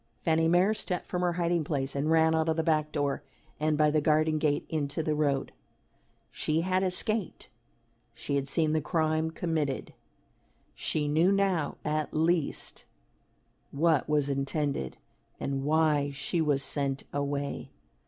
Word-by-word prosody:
Fanny 160 -1 +3
Mere 180 +5 +4
stepped 185 -4 -3
from 180 - -3
her 175 -1 +1
hiding 170 -1 +1
place 140 -2 -2
and 140 +2 0
ran 160 0 +4
out 160 0 +1
of 160 - +2
the 160 - +1
back 155 -1 +1
door, 145 -2 -1 0.4
and 155 0 +1
by 150 0 +4
the 155 0 +2
garden 155 +1 +2
gate 150 -2 +1
into 150 0 -2
the 155 - 0
road. 145 -2 0 0.8
She 155 +1 0
had 185 +2 +1
escaped. 190 +1 0 0.7
She - - -4
had 140 -1 0
seen 155 +1 +1
the 155 - +1
crime 155 +1 0
committed. 160 -5 -2 0.8
She 150 -2 -2
knew 160 +6 +3
now 195 -6 +1
at 155 0 -1
least 160 -1 0 0.9
what 155 -1 +1
was 150 -2 +2
intended 140 - -2 0.4
and 135 -1 -2
why 150 -2 +2
she 145 +4 -2
was 145 -3 +1
sent 140 -2 -2
away. 140 0 -3
155 Hz, 150 wpm, -29 LUFS, 145-165 Hz, 0.9 s, Mere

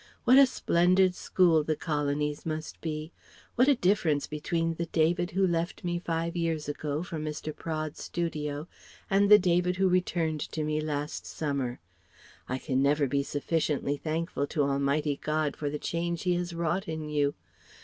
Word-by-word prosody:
What 255 +2 +7
a 275 - +8
splendid 185 -4 +3
school 170 -4 +3
the 155 +1 0
Colonies 150 -1 -1
must 155 -1 -5
be! 155 0 -4 0.4
What 250 +2 +4
a 285 - +6
difference 180 - +2
between 165 +2 -1
the 170 +1 -4
David 170 +2 +1
who 190 +2 +2
left 170 -1 -1
me 175 -1 -1
five 165 0 -2
years 165 -3 -1
ago 150 +1 -3
for 170 -3 -5
Mr. 155 0 -4
Praed's 155 -2 -4
studio 150 -3 -3 0.4
and 200 +1 +4
the 210 - +10
David 180 -1 +2
who 190 +1 +2
returned 175 -3 +1
to 155 - -1
me 155 0 0
last 150 -1 -3
summer! 140 -5 -2 0.7
I 130 - -1
can 130 -1 -1
never 145 +1 +3
be 140 +1 +1
sufficiently 145 0 -1
thankful 155 -1 -2
to 150 -1 0
Almighty 140 +1 0
God 155 -1 0
for 145 - -3
the 150 - -3
change 170 +2 -2
He 180 -1 +2
has 175 0 -2
wrought 170 +4 -1
in 160 -1 -4
you! 145 -1 0
160 Hz, 170 wpm, -29 LUFS, 150-175 Hz, 0.7 s, the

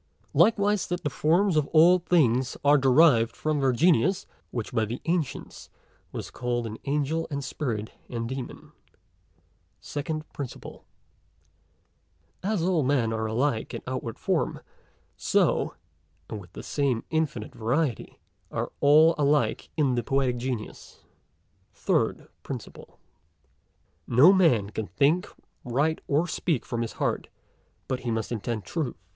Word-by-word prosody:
Likewise, 205 -2 +3
that 175 0 -3
the 145 - -1
forms 175 +6 +2
of 150 -2 +2
all 170 +3 +6
things 130 -8 +2
are 145 +1 +7
derived 130 -4 +5
from 155 -1 -1
their 135 -1 +3
Genius, 165 +5 +3 0.2
which 120 -3 -4
x - - -18
by 110 - +2
the 115 +3 -4
Ancients 165 -4 -3 0.4
was - - -6
call'd 120 -1 -2
an 110 0 -6
Angel 150 +3 -1
and 140 -2 -3
Spirit 115 -6 -3 0.2
and 115 -1 -3
Demon. 130 0 -7 1.1
PRINCIPLE 155 +1 -4 0.2
SECOND. - - -11 1.6
As 200 -2 -1
all 175 -3 +2
men 130 -5 +1
are 110 0 -1
alike 115 +1 -1
in - - -6
outward 125 -3 -4
form, - - -1 0.5
so - - +1 0.5
(and 105 - -6
with 90 -1 -16
the - - -8
same 135 -5 0
infinite 155 -9 -1
variety) 125 +2 -1 0.3
all 150 +3 +4
are - - -4
alike 145 +1 +1
in 140 -5 +2
the 120 - 0
Poetic 130 +1 0
Genius. 120 -3 -6 0.7
PRINCIPLE - - -3
THIRD. - - -29 1.1
No 140 +11 +7
man 125 - +3
con 110 -1 -4
think, 145 - +2 0.4
write 145 +6 0
or 150 +4 +2
speak 160 -5 -1
from 120 -1 -3
his 115 - -3
heart, - - -2 0.6
but 130 -1 -2
he 125 - -4
must, 110 0 -2
intend 110 -2 -3
truth. 145 - -3
135 Hz, 135 wpm, -26 LUFS, 115-160 Hz, 1.6 s, are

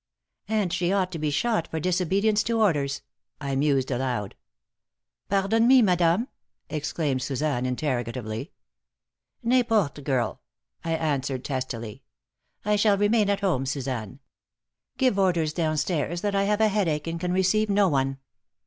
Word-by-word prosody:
"And 210 -5 0
she 175 0 0
ought 190 -2 +1
to 165 - -5
be 150 0 0
shot 170 +5 0
for 160 - -4
disobedience 190 +5 +1
to 230 0 0
orders," 145 -9 +1 0.4
I 140 -2 -3
mused, 135 -1 +1
aloud. 125 -5 -2 1.0
"Pardon 200 +4 +2
me, 260 -1 +7
madame?" 180 +3 +2 0.4
exclaimed 150 -3 -1
Suzanne, 135 -2 -1
interrogatively. 125 - -3 0.9
"N'importe, 225 - +2
girl," 130 -5 -1 0.4
I 165 - -1
answered, 140 -5 -1
testily. 125 -5 -4 0.6
"I 210 0 +2
shall 205 -1 +3
remain 205 +1 +3
at 200 0 0
home, 155 -10 0
Suzanne. 130 -3 -4 0.8
Give 255 -6 +2
orders 170 -5 +2
down 155 -2 0
stairs 170 +2 -1
that 205 -1 -1
I 195 0 +2
have 210 +1 +1
a 220 - +5
headache 170 -8 0
and 165 0 -3
can 180 +1 -2
receive 190 +4 +2
no 200 0 +4
one." 135 -4 0
165 Hz, 140 wpm, -26 LUFS, 135-200 Hz, 1.0 s, me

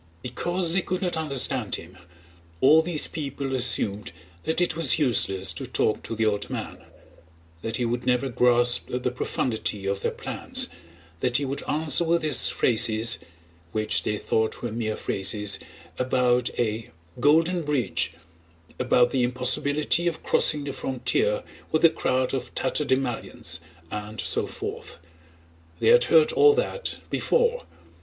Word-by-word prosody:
Because 170 +7 0
they 190 - +2
could 185 +1 -3
not 180 -2 -1
understand 135 -7 0
him 85 +3 -11 0.6
all 150 - +6
these 160 -2 +2
people 140 -3 -4
assumed 105 -7 +1 0.3
that 160 - 0
it 175 -3 +1
was 165 -4 +4
useless 100 -9 +2
to - - -7
talk - - 0
to 115 - -6
the 110 0 0
old 105 -1 -1
man; - - -6 0.8
that 115 0 -3
he 125 - -1
would 120 +1 -2
never 125 +2 +1
grasp 120 0 +3
the 125 0 -2
profundity 110 -5 -2
of 100 0 -2
their - - 0
plans, - - -1 0.5
that 125 - +2
he 145 - -1
would 135 +1 -3
answer 155 +2 +1
with 170 0 +1
his 155 - +5
phrases 110 -1 +2 0.5
(which 110 0 0
they 105 - -2
thought 110 +3 -1
were 120 - -3
mere 110 -1 -2
phrases) 100 +1 -1 0.4
about 125 -1 +1
a 110 -1 -2 0.3
"golden 165 +6 +3
bridge," 125 - 0 0.7
about 125 -1 +3
the 130 - 0
impossibility 130 +7 +1
of 170 - -3
crossing 150 -1 +2
the 140 -1 -5
frontier 425 - -1 0.3
with 155 +1 +3
a 165 - +7
crowd 130 -5 -1
of 130 -2 -4
tatterdemalions, 130 - -1 0.3
and 105 +1 -6
so - - 0
forth. - - -7 0.8
They - - +3
had 485 +1 +6
heard 465 -1 +4
all 435 -2 +5
that - - -3
before. 485 +1 +1
130 Hz, 145 wpm, -25 LUFS, 115-160 Hz, 0.8 s, a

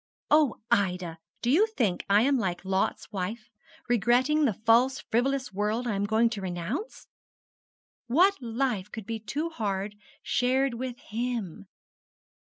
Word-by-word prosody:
'Oh, 300 -5 +5 0.2
Ida, 180 -4 0 0.2
do 240 - +2
you 395 +10 +5
think 230 - -1
I 205 +2 +5
am 280 +2 +3
like 185 -3 -2
Lot's 190 +3 -1
wife, 210 +3 -4 0.4
regretting 245 +6 +3
the 235 - +2
false 245 +4 +4
frivolous 260 0 0
world 210 +5 -1
I 235 - -1
am 200 0 0
going 220 +3 +3
to 210 -4 -4
renounce? 190 - -4 1.0
What 360 +10 +4
life 230 -4 -2
could 220 -3 -7
be 225 +1 -4
too 290 +10 -3
hard 205 -6 -2 0.3
shared 260 +1 +1
with 245 +1 -5 0.2
_him? 230 -7 -3
230 Hz, 140 wpm, -28 LUFS, 200-260 Hz, 1.0 s, Oh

